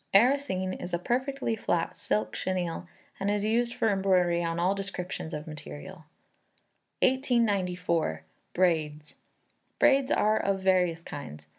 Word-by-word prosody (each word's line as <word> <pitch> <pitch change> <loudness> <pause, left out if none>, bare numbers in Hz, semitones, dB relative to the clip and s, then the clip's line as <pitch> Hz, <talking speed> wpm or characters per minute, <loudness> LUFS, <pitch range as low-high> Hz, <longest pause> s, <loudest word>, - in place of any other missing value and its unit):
Arrasene 205 -5 +3
is 175 -1 -4
a - - 0
perfectly 255 +4 -1
flat 175 -5 -1
silk 105 +1 -1
chenille 180 -2 -2 0.3
and 200 +1 0
is 205 0 0
used 235 +2 +1
for - - +1
embroidery 180 -3 +2
on 165 0 -1
all 180 +3 +2
descriptions 190 -4 -4
of 150 -1 -5
material. 160 +2 -9 1.0
1894. 185 - +1 0.3
Braids. 155 -4 +1 0.6
Braids 275 0 +4
are 215 +1 +3
of 195 -1 0
various 180 -3 +2
kinds. 75 - -8
185 Hz, 125 wpm, -28 LUFS, 165-210 Hz, 1.0 s, Braids